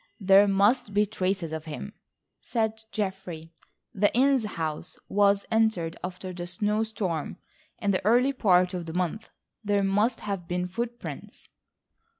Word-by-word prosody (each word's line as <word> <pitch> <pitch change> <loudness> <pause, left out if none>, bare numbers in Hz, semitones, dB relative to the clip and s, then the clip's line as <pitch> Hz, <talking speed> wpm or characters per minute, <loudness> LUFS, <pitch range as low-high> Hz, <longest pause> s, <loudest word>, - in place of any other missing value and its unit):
"There 195 0 +6
must 200 +2 +2
be 210 +1 +4
traces 190 -5 -2
of 160 0 -5
him," 165 +7 -7 0.5
said 220 -1 -2
Geoffrey. 190 -6 -4 0.4
"The 205 +1 +2
Inness 265 -2 +4
house 155 -2 -4
was 200 0 +3
entered 220 -7 +1
after 185 +1 -5
that 175 0 -6
snow 210 +4 0
storm 205 -8 -3 0.4
in 205 - 0
the 185 - 0
early 245 +6 +4
part 185 -7 +3
of 175 -2 -4
the 160 - -6
month. 185 +5 -2 0.3
There 205 -1 +1
must 210 +5 +1
have 195 -4 -4
been 180 0 -1
footprints." 235 +5 -6
200 Hz, 145 wpm, -27 LUFS, 180-220 Hz, 0.5 s, There